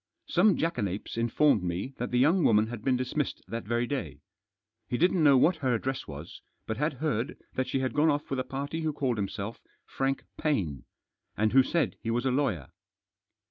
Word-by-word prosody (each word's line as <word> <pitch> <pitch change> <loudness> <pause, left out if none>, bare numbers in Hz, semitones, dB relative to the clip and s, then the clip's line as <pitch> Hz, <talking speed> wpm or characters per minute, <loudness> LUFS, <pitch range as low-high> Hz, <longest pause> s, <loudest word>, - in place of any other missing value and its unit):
Some 190 +3 +3
jackanapes 105 - -2
informed 115 +1 +3
me 90 +9 -3
that 125 - -2
the 125 - 0
young 160 +8 +4
woman 105 -3 +5
had 110 -1 -7
been 130 -2 +2
dismissed 130 +3 -2
that 115 +4 -5
very 120 +1 +1
day. 85 - -4 0.7
He 120 - 0
didn't 180 +1 +3
know 140 -3 +7
what 165 +7 +4
her 130 -5 +1
address 130 +3 -3
was, 75 +2 -9 0.2
but 110 - -3
had 150 +2 0
heard 135 -1 -2 0.2
that 130 0 -1
she 130 +1 -1
had 130 - -1
gone 150 +2 +3
off 145 0 0
with 135 - 0
a - - 0
party 140 +5 -4
who 155 -1 -1
called 130 -5 -1
himself 100 +2 -4 0.2
Frank 135 0 -1 0.2
Paine, 90 - -1 0.5
and 110 +1 +2
who 135 - +8
said 150 -1 0
he 115 - -4
was 120 +3 0
a 130 - +2
lawyer. 120 - 0
130 Hz, 195 wpm, -29 LUFS, 110-145 Hz, 0.7 s, who